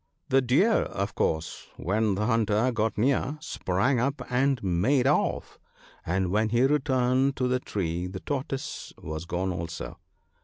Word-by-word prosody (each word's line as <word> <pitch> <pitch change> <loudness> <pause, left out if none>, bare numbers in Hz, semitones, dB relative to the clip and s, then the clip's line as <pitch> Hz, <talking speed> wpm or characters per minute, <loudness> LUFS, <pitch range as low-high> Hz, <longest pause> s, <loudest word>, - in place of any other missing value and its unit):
The 135 +1 +4
Deer, 145 - +3
of 100 +1 -3
course, 80 0 -2
when 105 +2 0
the 105 +2 -1
hunter 115 +1 +2
got 110 -1 -1
near, 135 +5 +1
sprang 115 +3 0
up 135 +3 0
and 135 +1 +2
made 105 +9 +2
off, 145 +2 0 0.4
and 90 +1 0
when 110 +2 +2
he 120 +3 +2
returned 135 -1 +2
to 125 - 0
the 125 0 +1
tree 90 -6 -3
the 95 +1 -6
Tortoise 135 -1 -4
was 80 +2 -6
gone 90 +2 -2
also. 85 -2 -6
115 Hz, 150 wpm, -27 LUFS, 95-130 Hz, 0.4 s, The